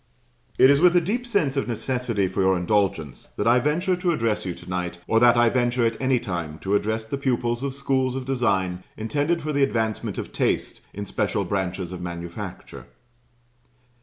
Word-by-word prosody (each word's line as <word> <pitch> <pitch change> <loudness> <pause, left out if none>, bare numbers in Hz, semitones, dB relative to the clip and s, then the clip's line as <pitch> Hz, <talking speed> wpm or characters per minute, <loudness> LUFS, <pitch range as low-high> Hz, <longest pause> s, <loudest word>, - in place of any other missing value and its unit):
It 130 - +7
is 140 +1 +3
with 180 0 +6
a - - +7
deep 230 +9 -2
sense 165 - +1
of 135 - -1
necessity 120 -3 -1
for 95 +1 -2
your 95 -1 +3
indulgence 90 -6 -1
that 105 - -1
I 120 +2 +5
venture 170 +8 +1
to 180 -1 +1
address 115 - -1
you 90 - -3
to - - -14
night, 90 -1 -3
or 115 - +3
that 120 0 +6
I 120 0 +5
venture 120 0 +1
at 115 0 +1
any 130 -1 +3
time 85 -8 -4
to 100 +1 0
address 110 +2 0
the 125 +5 -5
pupils 120 -3 0
of 135 -1 -3
schools 130 -2 0
of 130 -1 -4
design 95 -9 0
intended 145 +9 -1
for 155 0 -2
the 140 - +1
advancement 110 -5 0
of - - -6
taste - - -1
in 100 +1 -6
special - - -1
branches 95 -2 -2
of 90 -1 -6
manufacture. 85 -1 -7
120 Hz, 190 wpm, -24 LUFS, 95-135 Hz, -, It